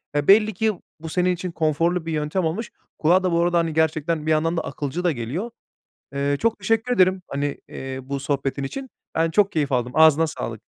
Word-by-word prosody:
Eee, 145 0 0
belli 215 +2 +6
ki 220 +3 +1 0.3
bu 160 +1 -7
senin 180 +2 +1
için 180 0 -5
konforlu 165 +2 0
bir 165 - -3
yöntem 155 +4 -1
olmuş. 185 +8 -3 0.3
Kulağa 175 +4 +4
da 185 - +1
bu 170 0 +2
arada, 175 0 +2
hani, 165 -1 -1
gerçekten 160 0 0
bir 155 - +1
yandan 165 +2 +1
da - - +1
akılcı 150 +4 -4
da 175 - +3
geliyor. 140 - -4 0.7
Eee, 140 +1 0
çok 230 +1 +1
teşekkür 225 +2 0
ederim, 185 -1 +3
hani, 140 0 -2
eee, 130 0 -6
bu 140 +1 -4
sohbetin 140 0 -2
için. 265 - -6 0.2
Ben 165 0 +1
çok 200 +4 +3
keyif 145 -3 0
aldım, 125 -1 0
ağzına 160 0 +6
sağlık. 115 -8 -5
160 Hz, 205 wpm, -23 LUFS, 145-180 Hz, 0.7 s, belli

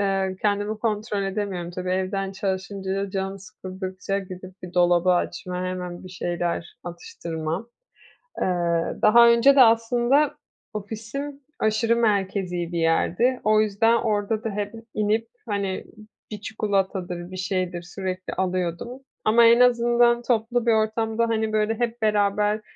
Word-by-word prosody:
Eee, 195 -1 0
kendimi 205 +1 0
kontrol 215 -2 -1
edemiyorum. 195 -3 -3
Tabii 180 +1 -4
evden 190 +1 -1
çalışınca, 195 0 -3
canım 195 0 -3
sıkıldıkça 185 +1 -5
gidip 185 -1 -10
bir 180 0 -9
dolabı 175 0 +4
açma, 180 0 -2
hemen 180 -1 -5
bir - - -8
şeyler 175 -2 -3
atıştırmam. 170 +2 -5 0.7
Eee, - - +2 0.6
daha 235 +2 +7
önce 235 +4 +6
de 275 - +7
aslında 240 +5 +4 0.4
ofisim 230 +7 -6 0.2
aşırı 220 +2 +2
merkezî 190 -6 0
bir 170 - -2
yerdi. 175 +10 +2
O 215 0 +4
yüzden 215 +2 +3
orada 215 -1 -1
da 225 - -1
hep 205 0 -4 0.2
inip, 215 +2 0 0.2
hani, 200 -2 -2 0.5
bir 210 - -6
çikolatadır, 190 -4 -2
bir 185 - -7
şeydir 185 -2 -2
sürekli 185 +1 -5
alıyordum. 185 +6 -2 0.3
Ama 230 +2 +6
en 230 +1 +6
azından 240 -1 +4
toplu 240 0 0
bir 235 - +4
ortamda, 220 +1 +1
hani, 220 -1 0
böyle, 215 +1 +2
hep 235 0 -2
beraber: 210 0 +2
205 Hz, 130 wpm, -24 LUFS, 185-225 Hz, 0.7 s, daha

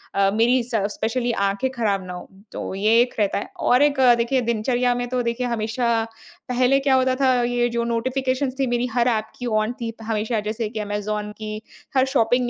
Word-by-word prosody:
अ, 195 0 +3
मेरी 240 +4 +3
स 235 0 -5 0.2
स्पेशली 240 +2 -1 0.2
आँखें 200 +7 -1
खराब 205 -6 -1
ना 180 - -6
हों। 180 - -8 0.2
तो - - -5
ये 215 +4 +3
एक 245 - -1
रहता 205 -2 +1
है। - - -5
और 250 +3 +3
एक 290 -2 +3
अ, 250 -2 +7
देखिए 240 +2 +1
दिनचर्या 240 +2 +1
में 245 0 -2
तो 250 -1 0
देखिए 235 +1 -1
हमेशा 230 0 0 0.5
पहले 255 +2 +3
क्या 270 -1 +2
होता 260 0 +2
था 260 -1 +3
ये 240 0 +1
जो 235 0 -1
नोटिफिकेशंस 255 +3 -1
थी 270 - +2
मेरी 240 0 0
हर 245 0 +2
ऐप 220 -3 +1
की 245 - -4
ऑन 215 0 0
थी 230 -1 -3
हमेशा। 220 +1 -1
जैसे 215 +1 -3
कि 215 - -5
Amazon 210 0 -3
की, 215 0 -6 0.4
हर 260 - +5
शॉपिंग 245 -2 +2
235 Hz, 205 wpm, -22 LUFS, 215-255 Hz, 0.5 s, अ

